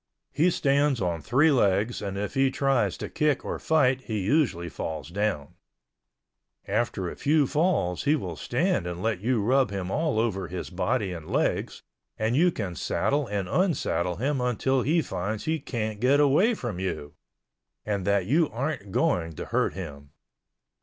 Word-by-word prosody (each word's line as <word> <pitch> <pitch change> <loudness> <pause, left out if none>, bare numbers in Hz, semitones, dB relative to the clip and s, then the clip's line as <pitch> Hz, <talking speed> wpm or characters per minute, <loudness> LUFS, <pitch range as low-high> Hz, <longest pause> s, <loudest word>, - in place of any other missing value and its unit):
He 170 +4 +3
stands 140 -4 +2
on 85 -4 -1
three 135 - +3
legs 105 -2 +2
and 100 -1 -4
if 105 +1 -3
he 135 0 +3
tries 135 -1 +1
to - - -5
kick 150 -3 0
or - - -3
fight 135 -5 +2
he 110 -2 -2
usually 100 - +1
falls 80 -1 -5
down. 95 -6 -2 1.1
After 100 -6 -1
a - - -5
few 150 0 +2
falls 150 - 0
he 145 +2 +4
will 90 - -4
stand 75 +4 0
and 90 +1 -5
let 110 -4 0
you 115 -1 +1
rub 130 +3 +3
him 95 -2 -4
all 155 -5 0
over 95 -5 -1
his 90 +2 -6
body 90 +1 -1
and 80 -3 -8
legs, - - -1 0.3
and 110 +2 0
you 175 +5 +4
can 100 - -4
saddle 140 - 0
and 100 -3 -2
unsaddle 95 - 0
him 135 +4 -1
until 125 +2 +1
he 160 +5 +2
finds 105 +4 -4
he 160 0 0
can't 110 -6 -4
get 130 +5 +4
away 150 - +4
from 115 - -5
you 90 -6 -4 0.7
and 100 -3 -1
that 100 -2 +2
you 155 - +2
aren't 125 -5 -4
going 85 -3 +1
to - - -6
hurt - - 0
him. 70 -6 -8
110 Hz, 170 wpm, -26 LUFS, 95-140 Hz, 1.1 s, he